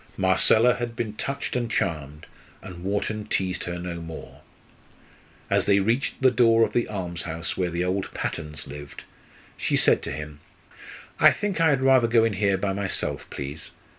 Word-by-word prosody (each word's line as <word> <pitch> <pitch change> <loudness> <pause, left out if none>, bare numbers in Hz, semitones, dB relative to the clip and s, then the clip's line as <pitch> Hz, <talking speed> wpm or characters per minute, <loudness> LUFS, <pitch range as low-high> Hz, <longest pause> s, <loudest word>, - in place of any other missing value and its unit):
Marcella 110 +6 +4
had 120 -1 -4
been 110 -2 -3
touched 140 +5 -4
and 120 -2 -1
charmed, 75 -7 -2 0.4
and 90 -2 -9
Wharton 105 +2 -2
teased 95 -1 -1
her 85 0 -4
no 85 -1 -5
more. 80 -1 -9 1.1
As - - +2
they 100 -1 +4
reached 115 +7 0
the 130 - +6
door 115 -2 +4
of - - 0
the 120 - +1
almshouse 85 -4 -4
where 90 -2 -1
the 85 +1 -1
old 95 +1 -2
Pattons 75 -2 -4
lived, 70 0 -9 0.5
she - - 0
said - - +4
to - - -5
him: 75 -1 -7 0.8
"I - - +8
think 200 -5 -2
I 165 - +5
had 135 -3 +2
rather 130 -3 +5
go 115 -1 +4
in 115 -2 +1
here 100 0 +1
by 95 0 -1
myself, 95 -1 -2
please. 70 +3 -6
95 Hz, 170 wpm, -25 LUFS, 85-115 Hz, 1.1 s, I